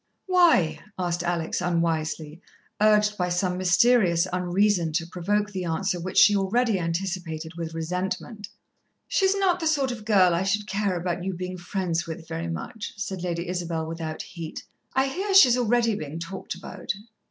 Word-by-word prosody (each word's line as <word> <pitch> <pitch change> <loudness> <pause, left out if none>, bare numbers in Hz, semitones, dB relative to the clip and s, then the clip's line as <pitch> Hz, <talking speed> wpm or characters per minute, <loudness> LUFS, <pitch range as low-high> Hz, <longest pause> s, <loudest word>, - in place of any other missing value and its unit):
"Why?" 325 - +4 0.3
said 175 +1 -1
Alex 175 -1 -1
unwisely, 165 -2 -1 0.4
urged 210 -1 +4
by 180 0 +1
some 180 +1 0
mysterious 185 -1 +4
unreason 180 -1 +1
to 165 +1 0
provoke 205 +4 -1
the 185 -3 -4
answer 175 +2 -1
which 185 +2 -5
she 210 -1 +7
already 205 +2 +1
anticipated 165 -2 -3
with 165 -1 -5
resentment. 185 +5 -4 0.6
"She's 385 0 +2
not 380 -3 +2
the 325 - -1
sort 280 -4 +1
of 225 -3 -7
girl 195 -5 +4
I 170 - +1
should 200 +2 0
care 200 -1 -1
about 175 0 -2
you 190 0 -3
being 180 +1 -5
friends 175 -2 -2
with 160 0 -7
very 165 +1 -4
much," 210 +6 -6
said 195 -3 -4
Lady 170 -1 -3
Isabel 170 -3 -2
without 160 -1 -5
heat. 165 -4 -8 0.3
"I 265 +1 +3
hear 385 +8 -2
she's 255 -11 +8
already 240 -1 +2
bein' 155 -5 -5
talked 170 +2 -6
about." 180 - -5
180 Hz, 165 wpm, -25 LUFS, 170-210 Hz, 0.6 s, she's